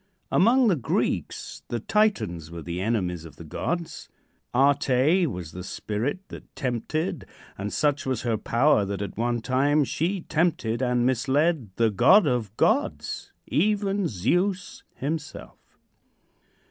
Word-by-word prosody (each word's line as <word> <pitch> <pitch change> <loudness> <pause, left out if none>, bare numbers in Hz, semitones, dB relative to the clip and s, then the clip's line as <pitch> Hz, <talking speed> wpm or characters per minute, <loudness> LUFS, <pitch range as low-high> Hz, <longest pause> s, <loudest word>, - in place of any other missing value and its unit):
Among 245 +5 +4
the 195 - +4
Greeks, 130 - -2
the 120 - -2
Titans 110 - 0
were 85 -1 -8
the 85 +2 -4
enemies 95 -6 -1
of 80 -4 -12
the 85 - -11
gods. 170 - -4 0.4
Ate 140 +5 +3
was 90 -7 -6
the 90 - -7
spirit 120 - -3
that - - -12
tempted, 145 - -2 0.3
and 100 +1 -4
such 145 - 0
was 130 -3 -1
her 115 -2 +1
power 115 +2 +2
that 100 0 -3
at 100 - -6
one 120 +1 -1
time 140 +5 +2
she 175 +7 -1
tempted 150 -10 0
and 125 -1 +1
misled 135 - +1
the 115 -2 +2
god 190 - +6
of 120 -6 -1
gods, - - 0
even 200 +1 +1
Zeus 180 - -1
himself. 150 +2 -6
130 Hz, 135 wpm, -25 LUFS, 105-165 Hz, 0.4 s, god